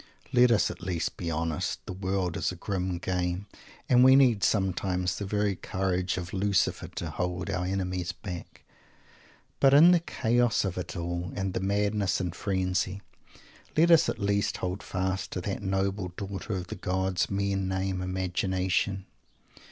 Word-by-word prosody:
Let 125 0 +6
us 115 -3 +3
at - - -10
least 90 -3 -2
be 85 - -4
honest. 80 -1 -2
The - - -5
world 95 -2 -1
is - - 0
a - - -7
grim 90 0 -2
game, 90 +1 -2 0.4
and 125 0 +6
we 130 +1 +8
need 125 -7 +4
sometimes 95 -2 0
the 100 - -4
very 105 -1 0
courage 95 0 -1
of 90 0 -5
Lucifer 100 0 +1
to - - -5
hold 90 -1 -3
our 90 -1 -1
enemies 90 -2 -2
back. 90 -1 -8 1.0
But 135 0 +6
in 165 +5 +9
the 175 - +5
chaos 120 -8 +1
of 95 -2 -2
it 90 -1 -6
all, 85 +1 -3
and 95 -2 -2
the - - -1
madness 100 0 +1
and 90 -2 -2
frenzy, 95 0 -1 0.7
let 170 +2 +5
us 165 - +6
at - - -2
least 100 0 0
hold 90 +2 -3
fast 95 0 -2
to 90 - -3
that 100 +3 -3
noble 95 0 -1
daughter 100 +2 -5
of 90 -2 -3
the 110 - -4
gods 95 -1 -1
men 100 -1 -1
name 95 0 -1
_Imagination. 95 +1 -1
95 Hz, 165 wpm, -28 LUFS, 90-100 Hz, 1.0 s, in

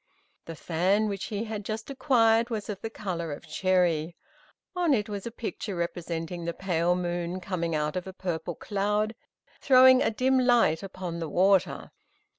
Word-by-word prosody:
The 165 - -7
fan 185 +7 +1
which 200 -2 -3
he 210 0 -3
had 215 -2 -5
just 220 +5 -5
acquired 235 -4 +3
was 220 -3 -4
of 200 -2 -5
the 225 - -4
color 180 -7 -4
of 145 +3 -8
cherry. 175 -1 +1 0.6
On 345 -6 +3
it 210 -3 -1
was 205 0 -5
a - - -5
picture 220 -3 -5
representing 170 0 -4
the 170 - -3
pale 175 -2 +1
moon 175 0 -3
coming 175 -3 -2
out 150 0 -1
of 185 0 -3
a - - -5
purple 175 -3 -4
cloud, 210 +2 -1 0.5
throwing 260 -1 +7
a - - +3
dim 255 +4 +2
light 240 -10 +3
upon 185 -3 -6
the 165 -2 -4
water. 190 +3 +2
190 Hz, 170 wpm, -27 LUFS, 170-220 Hz, 0.6 s, throwing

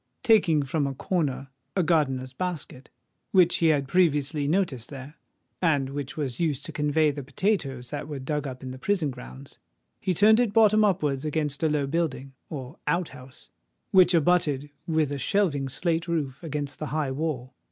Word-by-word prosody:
Taking 190 - +4
from 140 +1 -1
a 135 - -4
corner 135 -4 -2 0.3
a 185 - +2
gardener's 135 -6 +1
basket, 155 -4 -5 0.4
which 180 -3 +4
he 165 - +3
had 145 -4 +2
previously 150 -4 +2
noticed 150 - 0
there, 140 0 -9 0.5
and 145 -6 +2
which 140 0 -5
was 135 -6 -3
used 150 -5 -1
to - - -6
convey 150 0 +2
the 145 0 -6
potatoes 135 - -2
that 145 0 -4
were 150 -2 -5
dug 145 +2 -2
up 130 -1 -8
in 130 - -5
the 130 - -9
prison 175 -4 0
grounds, 65 - -11 0.4
he 185 -2 -1
turned 215 +5 +6
it 235 -4 +1
bottom 215 -1 +5
upwards 150 -9 +1
against 150 -2 -1
a 160 - +2
low 150 -2 +1
building, 140 -3 -2 0.2
or 135 -1 -7
out 175 -1 +1
house, 130 -1 -13 0.4
which 185 -3 +6
abutted 150 -4 +2 0.2
with 155 -3 +1
a 140 - -3
shelving 145 -7 +1
slate 165 +4 -1
roof 145 -6 -2
against 145 -3 -4
the 155 - -3
high 150 -3 -1
wall. 130 -3 -3
150 Hz, 175 wpm, -26 LUFS, 135-170 Hz, 0.5 s, turned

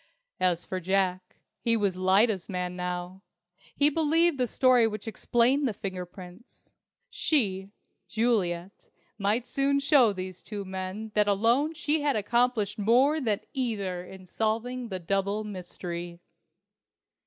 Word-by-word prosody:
As 180 -2 +1
for 185 - -4
Jack, 185 0 -1 0.2
he 230 -1 +2
was 200 -4 0
Lyda's 190 +2 +2
man 180 -1 -3
now! 180 +1 -5 0.5
He 290 +1 +4
believed 325 0 +2
the 250 - +2
story 250 -2 +4
which 215 0 -6
explained 245 +5 +2
the 220 - -3
fingerprints. 185 +1 -9 0.4
She, 195 -10 +1 0.4
Juliet, 200 -6 -1 0.3
might 210 +4 +1
soon 275 +2 +1
show 280 -5 +5
these 185 -2 -6
two 205 -2 -6
men 190 +3 -5
that 210 -1 +3
alone 235 +10 +2
she 305 0 0
had 290 -1 +1
accomplished 220 -1 +1
more 260 +9 +3
than 215 -6 0
either 205 -9 -2
in 185 +1 -12
solving 230 +6 -2
the 190 - -3
double 195 +4 -1
mystery. 175 -3 -6
210 Hz, 130 wpm, -27 LUFS, 185-245 Hz, 0.5 s, show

